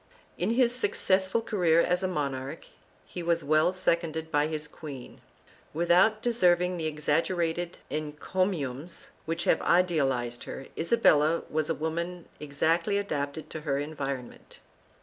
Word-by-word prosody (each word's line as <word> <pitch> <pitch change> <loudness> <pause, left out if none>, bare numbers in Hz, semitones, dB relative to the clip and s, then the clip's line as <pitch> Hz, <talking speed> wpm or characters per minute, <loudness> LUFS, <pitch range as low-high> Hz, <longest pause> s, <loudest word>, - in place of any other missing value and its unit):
In 180 - -1
his 245 -1 +4
successful 195 -3 +2
career 175 -8 +2
as 180 +1 +2
a 190 - +1
monarch 140 -3 -3 0.4
he 180 - -7
was 170 -1 +1
well 155 +4 +3
seconded 165 -3 -1
by 150 0 +2
his 155 -1 -4
queen. 145 -4 -10 0.5
Without 175 +6 +3
deserving 180 -6 +3
the 160 -2 -2
exaggerated 165 +3 -1
encomiums 155 0 -2 0.2
which 165 +1 -2
have - - +2
idealized 135 -9 +1
her, 135 - -7
Isabella 165 -4 +3
was 155 0 0
a 165 - +1
woman 170 +2 -3
exactly 165 +6 +1
adapted 150 -6 -3
to 155 - -6
her 140 -3 -1
environment. 140 -4 -5
165 Hz, 130 wpm, -28 LUFS, 150-180 Hz, 0.5 s, his